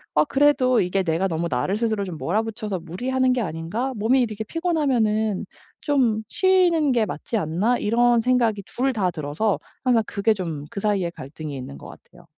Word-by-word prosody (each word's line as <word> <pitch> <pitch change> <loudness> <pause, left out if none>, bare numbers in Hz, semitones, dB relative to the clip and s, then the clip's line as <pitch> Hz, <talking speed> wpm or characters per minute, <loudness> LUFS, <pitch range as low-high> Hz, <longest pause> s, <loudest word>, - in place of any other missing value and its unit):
'어 150 - +4
그래도 270 - +3
이게 190 +1 0
내가 170 +3 0
너무 165 0 -1
나를 185 +12 0
스스로 220 -3 0
좀 180 -4 -6
몰아붙여서 215 +2 -2
무리하는 255 +10 0
게 250 - +1
아닌가? 190 +9 -3
몸이 230 +5 +2
이렇게 220 -2 -2
피곤하면은 235 - 0 0.4
좀 245 -7 +1
쉬는 350 - +3
게 235 -3 +2
맞지 215 +4 -4
않나?' 195 +8 +1
이런 240 +2 +3
생각이 235 -4 +2
2 265 +2 -1
다 190 -5 +1
들어서 155 +7 -1 0.3
항상 235 -3 +4
그게 210 +2 +1
좀 165 -7 -5
그 200 - -6
사이에 200 -5 +1
갈등이 150 0 -8
있는 125 - -7
것 - - -11
같아요. - - -16
215 Hz, 360 characters per minute, -23 LUFS, 180-250 Hz, 0.4 s, 어